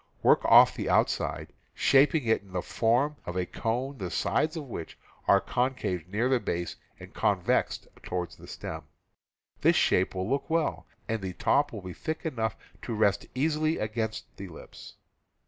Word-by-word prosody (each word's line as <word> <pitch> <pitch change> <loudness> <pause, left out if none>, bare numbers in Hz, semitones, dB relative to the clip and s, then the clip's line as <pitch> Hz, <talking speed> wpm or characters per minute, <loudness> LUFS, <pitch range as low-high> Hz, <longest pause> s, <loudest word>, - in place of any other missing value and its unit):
Work - - +5
off - - +7
the - - -3
outside, - - +1 0.2
shaping 145 +2 +4
it 110 0 +2
in 95 -2 -18
the 90 - -2
form 125 +6 +1
of 90 - -4
a 90 - 0
cone 125 +7 -3
the 90 -3 -3
sides 155 - 0
of 155 - -4
which 115 - -7 0.3
are 100 - +6
concaved 125 -9 -1
near 105 +6 0
the 130 -1 +3
base 85 -5 -3 0.2
and - - -12
convexed - - 0
toward 90 -2 -3
the - - -14
stem. - - -7 0.8
This - - +5
shape 95 +1 +2
will 95 0 -2
look 140 +4 -1
well, 165 -1 0 0.2
and 115 -2 -2
the 95 -1 -4
top 145 +10 +2
will 105 -4 -7
be 90 -1 -6
thick 160 - -5
enough 115 -9 -1 0.3
to 115 - -4
rest 105 -2 +2
easily 155 +3 +1
against 110 0 -3
the 100 - -7
lips. 85 - -12
115 Hz, 170 wpm, -28 LUFS, 95-140 Hz, 0.8 s, off